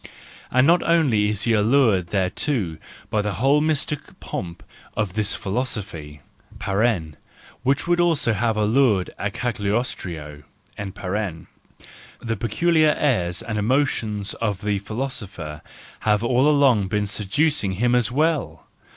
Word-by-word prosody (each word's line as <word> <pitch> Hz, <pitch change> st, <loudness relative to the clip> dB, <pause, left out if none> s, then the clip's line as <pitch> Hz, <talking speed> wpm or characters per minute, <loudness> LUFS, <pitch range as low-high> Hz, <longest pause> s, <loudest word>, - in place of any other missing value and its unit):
And 130 Hz, +1 st, +4 dB
not 170 Hz, +4 st, +5 dB
only 135 Hz, -12 st, +3 dB
is 105 Hz, -1 st, -2 dB
he 115 Hz, -, +2 dB
allured 110 Hz, -4 st, +3 dB
thereto 95 Hz, -, -1 dB, 0.3 s
by 105 Hz, -, +2 dB
the 105 Hz, -1 st, -2 dB
whole 140 Hz, +7 st, +3 dB
mystic 150 Hz, -1 st, -2 dB
pomp 85 Hz, -2 st, -6 dB, 0.3 s
of 105 Hz, -4 st, -1 dB
this 105 Hz, -1 st, +1 dB
philosophy 95 Hz, -, -4 dB, 1.4 s
(which 135 Hz, +4 st, 0 dB
would 175 Hz, 0 st, +2 dB
also 165 Hz, -9 st, +3 dB
have 110 Hz, +1 st, 0 dB
allured 110 Hz, -3 st, +2 dB
a 105 Hz, -, -1 dB
Cagliostro), 100 Hz, -10 st, -3 dB, 0.3 s
the 100 Hz, +3 st, -6 dB
peculiar 155 Hz, -, +2 dB
airs 90 Hz, -12 st, 0 dB
and 110 Hz, -2 st, -3 dB
emotions 110 Hz, -4 st, 0 dB
of 105 Hz, -4 st, -2 dB
the 105 Hz, -1 st, 0 dB
philosopher 100 Hz, -, -5 dB, 0.4 s
have 105 Hz, 0 st, +1 dB
all 125 Hz, +4 st, +3 dB
along 135 Hz, -9 st, +4 dB
been 105 Hz, +2 st, 0 dB
seducing 105 Hz, +2 st, 0 dB
him 120 Hz, +6 st, +1 dB
as 120 Hz, -2 st, +2 dB
well! 155 Hz, +2 st, 0 dB
110 Hz, 120 wpm, -23 LUFS, 100-135 Hz, 1.4 s, not